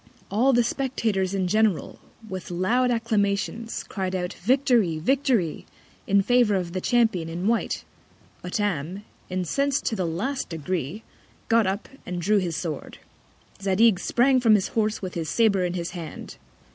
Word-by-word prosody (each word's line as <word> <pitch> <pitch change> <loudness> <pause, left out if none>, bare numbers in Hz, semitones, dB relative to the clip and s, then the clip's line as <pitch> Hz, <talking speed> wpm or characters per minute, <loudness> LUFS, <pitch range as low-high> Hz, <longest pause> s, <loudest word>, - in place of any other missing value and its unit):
All 240 +7 +3
the 240 -2 +4
Spectators 220 -7 -1
in 190 -2 0
general, 215 -2 +1 0.3
with 185 -3 -6
loud 220 +9 +1
Acclamations, 225 -1 -1
cried 190 -2 -3
out, 180 -1 -2
Victory! 235 - +2
Victory! 245 - 0 0.4
in 200 0 +4
favour 240 -2 +3
of 180 -3 -2
the 185 - -2
Champion 220 -9 +2
in 175 +3 -4
white. 230 0 0 0.6
Hottam, 180 -1 -2 0.3
incens'd 265 - 0
to 225 - 0
the 185 -4 -1
last 215 +12 -2
Degree, 170 +3 -3 0.5
got 225 -3 +4
up, 195 +2 -2 0.2
and 180 -1 -4
drew 205 +4 +3
his 175 -4 -2
Sword. 160 -4 -5 0.6
Zadig 200 +1 +4
sprang 255 +5 +3
from 225 -3 +5
his 195 - 0
Horse 215 -2 -1
with 185 - -4
his 165 -3 -3
Sabre 200 -5 +3
in 180 0 -2
his 170 -1 -3
Hand. 170 -5 -8
200 Hz, 150 wpm, -25 LUFS, 180-230 Hz, 0.6 s, from